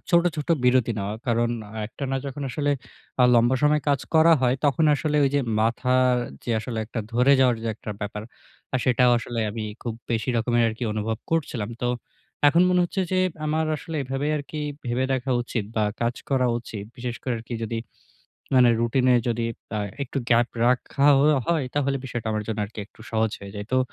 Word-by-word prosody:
ছোট, 170 -1 +5
ছোট 150 - -4 0.2
বিরতি 125 -2 +3
নেওয়া। 100 +1 -3
কারণ 120 0 +2 0.4
একটানা 135 +3 -4
যখন 140 +1 -5
আসলে 145 +3 0 0.5
আ - - +7
লম্বা 120 +2 +4
সময় 150 0 +4
কাজ 140 -3 +2
করা 160 +1 +7
হয় 125 -1 +3
তখন 150 +3 +3
আসলে 150 +1 -1
ওই - - +4
যে 145 - +4 0.2
মাথার 125 +2 +2 0.3
যে - - -3
আসলে 115 -2 -4 0.3
ধরে 125 +4 +4
যাওয়ার 125 -2 +4 0.2
একটা 110 - -8
ব্যাপার 105 0 -4 0.5
আ - - +5
সেটাও 125 0 +4
আসলে 120 0 -4
আমি 110 +1 -4 0.2
খুব 115 -2 -3 0.2
বেশি 115 +1 -1
রকমের 120 +1 +2
আরকি 115 +2 -4
অনুভব 110 +1 -2
করছিলাম। 130 -10 -1
তো 120 - +1 0.6
এখন 170 +4 +4
মনে 180 0 +3
হচ্ছে 190 +3 -2
যে 185 - +2 0.3
আমার 155 +1 +1
আসলে 160 +1 -6
এভাবে 135 +2 -3
আরকি 150 +1 -5 0.3
ভেবে 120 +2 0
দেখা 130 0 -1
উচিত 120 -3 -3
বা 110 - +3 0.2
কাজ 120 +1 0 0.2
করা 130 -2 +3
উচিত। 110 -3 -7
বিশেষ 120 -1 -4
করে 130 - -2
আরকি 115 +2 -7
যদি 115 +1 -2 0.8
মানে 125 -2 +7
রুটিনে 125 +2 +3
যদি 115 0 0 0.3
আ - - 0 0.2
একটু 140 +1 -3
গ্যাপ 120 0 +4 0.2
রাখা 125 +3 +2
হ - - +4 0.3
হয়। 165 -5 +2
তাহলে 140 -1 +1
বিষয়টা 120 -3 -4
আমার 110 0 -1
জন্য 110 - -2
আর 100 - -9 0.2
একটু - - -24
সহজ 110 -1 +1
হয়ে 100 -1 -9
যায়। 105 0 -6
তো 130 - +4
125 Hz, 185 wpm, -24 LUFS, 115-140 Hz, 0.8 s, আ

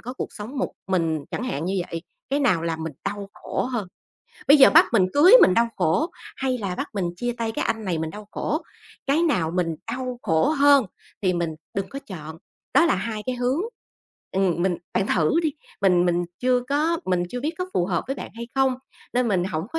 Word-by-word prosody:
có 250 +2 -7
cuộc - - -5
sống 225 +7 -7
một - - -1 0.2
mình, 165 -5 0
chẳng - - -3
hạn 165 - -3
như 195 - -1 0.2
vậy, 165 0 -4 0.3
cái 280 - +1
nào 210 - +2
làm 165 -1 -2
mình 160 - -4
đau 200 -1 -4
khổ - - -3
hơn? 235 -7 -3 0.6
Bây 290 - +9
giờ 270 - +9
bắt 325 +4 +7
mình 190 -5 +4
cưới 330 +8 +7
mình 185 - +6
đau 235 +3 +3
khổ 295 - +1 0.3
hay 260 -1 -1
là 195 -5 -3
bắt - - -3
mình 195 -3 -1
chia 240 +3 -2
tay 225 -1 -1
cái - - -2
anh 225 -1 -2
này 175 -4 -1
mình 160 0 -3
đau 210 +2 -10
khổ? 310 +3 -2 0.4
Cái 295 +5 +2
nào 180 - +1
mình 170 -3 0 0.2
đau 250 0 -4
khổ 160 - +2
hơn 285 -5 +5 0.4
thì 185 - +2
mình 170 -2 -1 0.2
đừng 195 -1 -2
có 275 - -6
chọn, 160 -4 -8 0.4
đó 340 - +6
là - - +3
2 220 -2 -4
cái 255 - -1
hướng. 250 +6 0 0.7
Ừm, 185 -3 +1
mình 180 -1 +1 0.2
bạn 195 - +1
thử 180 - +2
đi, 310 -3 0 0.3
mình 180 -2 +4
mình 175 0 +1 0.2
chưa 250 0 +3
có 315 +4 +1
mình 180 -1 +1
chưa 245 - -4
biết 305 +5 -1
có 365 - -2
phù 175 - +2
hợp 175 -3 -1
với 270 +1 -3
bạn - - -7
hay 235 +1 -7
không? 265 -1 +3 0.4
Nên 250 -1 +1
mình 185 -4 +1
hổng 165 -1 -3
có 325 - -1
210 Hz, 230 wpm, -24 LUFS, 175-265 Hz, 0.7 s, Bây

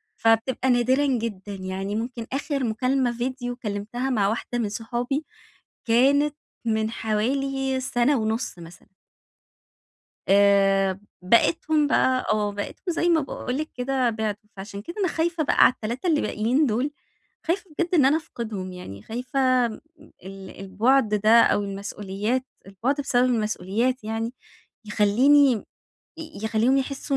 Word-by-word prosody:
فبتبقى 225 +3 +1
نادرًا 255 +3 +3
جدًا، 225 -7 -2
يعني 190 +1 -4
ممكن 230 +1 -4
آخر 280 0 -2
مكالمة 255 +2 +1
فيديو 245 0 -3
كلمتها 225 +2 -4
مع 215 -6 +2
واحدة 240 +2 -3
من 220 -3 -1
صحابي، 240 +7 -3 0.6
كانت 280 +5 +3 0.3
من 220 -1 0
حوالي 265 +5 -1
سنة 255 +2 +1
ونُص 220 -2 -2
مثلًا. 170 +2 -14 1.3
آآ 195 -1 +4 0.2
بقِيتهم 300 - +3
بقى، 260 -2 +2
آه 210 -1 0
بقِيتكم 205 - -5
زي 340 +1 0
ما 335 -2 +4
باقول 255 -2 -4
لِك 310 +1 -4
كده 255 -1 0
بِعدوا. 215 -1 -4
فعشان 200 +1 -8
كده 340 - -8
أنا 380 - +2
خايفة 330 0 -1
بقى - - +5
على - - +6
ال3 235 +8 -5
اللي 315 -4 +3
باقيين 245 +8 +1
دُول، 250 +5 0 0.6
خايفة 345 +2 -1
بجد 350 +1 0
إن 300 -6 +5
أنا 275 +3 +4
أفقِدهُم 220 - -6
يعني، 100 - -9
خايفة 255 +1 +1
م 220 - -9 0.4
ال 190 0 -9
البعد 215 +4 +2
ده 215 +3 +5
أو 205 - +2
المسؤوليات 200 +4 -3 0.2
البعد 235 +9 -2
بسبب 250 -3 +2
المسؤوليات 225 +1 0
يعني 225 +2 -3 0.5
يخلّيني 250 +7 +4 0.7
ي 320 -7 -9
يخليهم 225 +5 +2
يحسّوا 275 +1 -2
240 Hz, 135 wpm, -24 LUFS, 210-270 Hz, 1.3 s, على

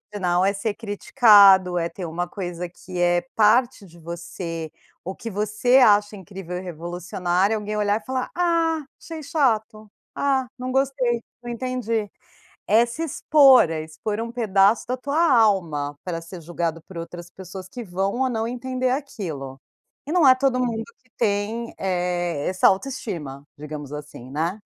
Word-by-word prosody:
original 180 -2 +1
é 195 +1 +2
ser 205 +2 -2
criticado, 205 -4 +5
é 170 -1 0
ter 180 +1 -7
uma 175 +2 -3
coisa 180 -2 -5
que 180 +1 -9
é 175 0 +3
parte 225 0 +3
de 170 -2 -17
você, 165 -1 -6 0.3
o 190 +2 -5
que 230 - -7
você 215 +5 +2
acha 210 -4 +5
incrível 190 -2 -7
e - - -5
revolucionário. 180 +3 -1
Alguém 210 0 -4
olhar 210 +1 +1
e - - -23
falar: 260 -1 -3
"Ah, 335 -2 +1 0.2
achei 320 -1 -8
chato. 225 -8 0 0.3
Ah, 270 -2 +1
não 255 0 -4
gostei. 260 -3 +1 0.2
Não 240 - -5
entendi". 235 -3 -2 0.6
É 220 +3 +5
se 240 +8 -4
expor, 275 - +5
é 160 -1 -3
expor 205 +7 -5
um 230 0 -5
pedaço 210 -2 +3
da 255 - -1
tua 280 +4 -2
alma 175 - +2
pra 170 -2 -3
ser 165 +2 -10
julgado 165 0 -3
por 175 +1 -10
outras 175 +1 -8
pessoas 185 0 -10
que 240 +5 -7
vão 195 +1 -2
ou 265 - +2
não 225 -2 -2
entender 255 +1 -2
aquilo. 165 - -5 0.5
E 300 - -4
não 345 -4 +4
é 260 - +8
todo 255 -1 +1
mundo 235 -3 -1 0.2
que 255 - -33
tem, 220 +2 -1
eh, 175 -4 -1
essa 185 0 +2
autoestima, 190 - -3
digamos 150 -1 -8
assim, 150 -4 -9
né. 165 +8 -2
205 Hz, 165 wpm, -23 LUFS, 175-245 Hz, 0.6 s, é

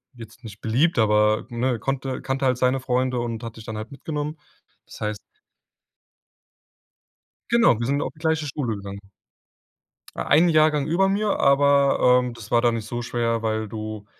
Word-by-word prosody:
jetzt 115 0 -13
nicht 105 -3 -11
beliebt, 130 +7 +1
aber 105 0 +3
ne, 120 0 -1
konnte 135 0 -3
kannte 135 +1 -2
halt 130 -2 +2
seine 130 +1 +1
Freunde 130 0 -1
und 120 -1 -4
hat 115 -1 -7
mich 110 - -11
dann 110 -2 -6
halt 110 +1 -7
mitgenommen. 150 +2 -5 0.5
Das - - -13
heißt 105 -1 -2 2.3
Genau, 235 - +4
wir 115 - -2
sind 140 +1 0
auf - - -5
die 155 - -21
gleiche 160 -1 0
Schule 130 -5 -3
gegangen. 100 0 -8 1.2
E - - -7
ein 165 +5 +4
Jahrgang 155 -2 +3
über 180 +4 +2
mir, 200 +1 0
aber, 140 -2 +4
ähm, 125 -1 -4
das 115 -4 -12
war 120 - +4
dann 120 -1 +2
nicht 110 -2 -5
so 120 +1 -4
schwer, 115 -1 -1
weil 110 0 -1
du 110 -1 -7
125 Hz, 175 wpm, -23 LUFS, 110-140 Hz, 2.3 s, Genau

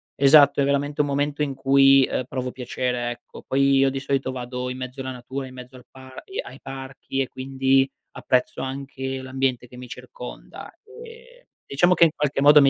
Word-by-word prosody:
esatto, 140 0 +6
è - - +4
veramente 140 +1 0
un 145 - 0
momento 145 +1 -1
in 140 -2 -1
cui, 135 0 +5
uhm, - - -1
provo 130 -1 -4
piacere, 125 -1 -3
ecco. 120 0 -11
Poi 140 +1 +2
io, 135 0 +4
di 135 - -3
solito, 135 -1 -1
vado 125 0 -5
in 125 - -5
mezzo 130 +1 -6
la 130 0 -4
natura, 130 +2 -6
in 130 - -12
mezzo 125 0 -11
al 125 - -16
par 130 0 -12
i 390 - -7
ai 130 - -12
parchi, 135 0 -6
e, 130 - -1
quindi, 135 0 +1 0.2
apprezzo 125 -1 -1
anche 135 0 -5
l'ambiente 130 -2 -2
che 125 - -14
mi 125 0 -9
circonda, - - -10 0.2
ehm, 470 +3 -14 0.2
diciamo 175 +6 +3
che, 175 - +4
in - - +4
qualche 145 -2 -1
modo, 145 +1 +8
mi 140 - +6
135 Hz, 200 wpm, -23 LUFS, 130-140 Hz, 0.2 s, modo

